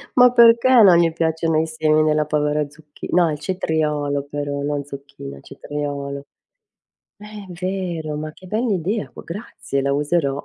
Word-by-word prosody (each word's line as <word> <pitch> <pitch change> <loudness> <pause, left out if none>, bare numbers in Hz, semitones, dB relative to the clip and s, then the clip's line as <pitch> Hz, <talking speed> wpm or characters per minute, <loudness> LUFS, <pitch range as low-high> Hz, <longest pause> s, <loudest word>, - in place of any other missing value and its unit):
Ma 250 -1 +7
perché 235 +1 +6
non 185 -4 +7
gli 170 -1 +3
piacciono 160 -1 0
i 160 - 0
semi 155 -1 +1
nella 155 0 +2
povera 150 0 0
zucchi 150 0 -12
no 175 -2 +3
il 150 - -3
cetriolo 150 -4 -1
però, 145 0 -4
non 145 0 -2
zucchina, 140 - -10
cetriolo. 140 -1 -5 1.0
È 210 - -12 0.3
vero, 180 -5 -3
ma 155 +1 -5
che 185 - -16
bell'idea, 210 -1 -1
c - - -12
grazie, 170 -6 -5
la 140 +1 0
userò. 145 -1 0
155 Hz, 150 wpm, -21 LUFS, 145-175 Hz, 1.0 s, Ma